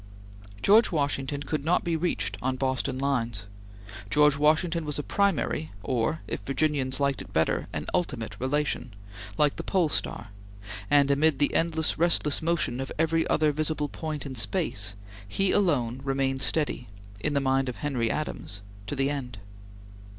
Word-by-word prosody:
George 215 Hz, +3 st, +6 dB
Washington 145 Hz, -2 st, -1 dB
could 150 Hz, -1 st, -2 dB
not 170 Hz, +4 st, +2 dB
be 170 Hz, -1 st, 0 dB
reached 105 Hz, -, -1 dB
on 130 Hz, +1 st, 0 dB
Boston 130 Hz, -1 st, -1 dB
lines. 120 Hz, -7 st, -1 dB, 0.6 s
George 150 Hz, +3 st, +5 dB
Washington 160 Hz, +3 st, +2 dB
was 150 Hz, -1 st, -3 dB
a 145 Hz, -, -2 dB
primary, 195 Hz, -5 st, 0 dB
or, 125 Hz, +5 st, 0 dB
if -, -, -3 dB
Virginians 135 Hz, +2 st, 0 dB
liked 140 Hz, -1 st, +1 dB
it -, -, -11 dB
better, 80 Hz, 0 st, +1 dB
an 75 Hz, -4 st, -4 dB
ultimate 130 Hz, -11 st, -2 dB
relation, 130 Hz, -4 st, -1 dB, 0.4 s
like 150 Hz, -1 st, +3 dB
the -, -, -4 dB
Pole 180 Hz, -5 st, +2 dB
Star, 120 Hz, -, -2 dB, 0.6 s
and 140 Hz, -1 st, +5 dB
amid 145 Hz, +1 st, +3 dB
the 145 Hz, -, +2 dB
endless 160 Hz, -1 st, +1 dB
restless 165 Hz, -3 st, +2 dB
motion 160 Hz, -7 st, 0 dB
of 135 Hz, -, -4 dB
every 165 Hz, +1 st, +2 dB
other 155 Hz, -1 st, +3 dB
visible 150 Hz, 0 st, -1 dB
point 155 Hz, -3 st, -5 dB
in 135 Hz, -, -5 dB
space, 105 Hz, -2 st, -1 dB, 0.3 s
he 195 Hz, -, +1 dB
alone 130 Hz, -, +1 dB
remained 135 Hz, -1 st, 0 dB
steady, 145 Hz, -5 st, 0 dB, 0.3 s
in 130 Hz, -, -1 dB
the -, -, +4 dB
mind 135 Hz, -1 st, +1 dB
of 125 Hz, -, -5 dB
Henry 125 Hz, -6 st, -1 dB
Adams, 105 Hz, -9 st, -3 dB, 0.3 s
to -, -, -3 dB
the 135 Hz, +1 st, +1 dB
end. 125 Hz, -6 st, -5 dB
140 Hz, 160 wpm, -27 LUFS, 130-155 Hz, 0.6 s, George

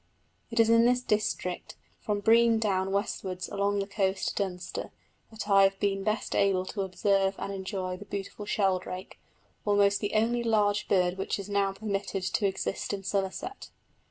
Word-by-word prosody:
It 230 Hz, -, -2 dB
is 225 Hz, -, +6 dB
in 230 Hz, +1 st, +5 dB
this 250 Hz, +1 st, +3 dB
district, 210 Hz, -5 st, -1 dB, 0.2 s
from 205 Hz, -1 st, -2 dB
Brean 230 Hz, +1 st, +5 dB
Down 195 Hz, -3 st, 0 dB
westwards 195 Hz, -2 st, -2 dB
along 200 Hz, 0 st, 0 dB
the 200 Hz, -, 0 dB
coast 195 Hz, -1 st, 0 dB
to -, -, -5 dB
Dunster, 180 Hz, -3 st, -4 dB, 0.4 s
that 220 Hz, -2 st, -7 dB
I 195 Hz, -1 st, +6 dB
have 195 Hz, 0 st, +3 dB
been 195 Hz, -1 st, 0 dB
best 215 Hz, +1 st, -1 dB
able 190 Hz, -2 st, +2 dB
to 200 Hz, +2 st, -4 dB
observe 195 Hz, +1 st, +1 dB
and 200 Hz, -, -4 dB
enjoy 190 Hz, -1 st, -4 dB
the 205 Hz, -, -10 dB
beautiful 200 Hz, +1 st, -6 dB
sheldrake 185 Hz, -2 st, -1 dB, 0.4 s
almost 200 Hz, -1 st, +3 dB
the 205 Hz, +1 st, -3 dB
only 235 Hz, +2 st, +2 dB
large 210 Hz, -3 st, +2 dB
bird 180 Hz, -1 st, +2 dB
which 195 Hz, -, -1 dB
is 200 Hz, 0 st, -7 dB
now 200 Hz, -1 st, +1 dB
permitted 195 Hz, -2 st, -3 dB
to 200 Hz, +2 st, +1 dB
exist 190 Hz, +1 st, -3 dB
in 195 Hz, -1 st, -4 dB
Somerset. 195 Hz, -, -3 dB
200 Hz, 170 wpm, -29 LUFS, 190-210 Hz, 0.4 s, is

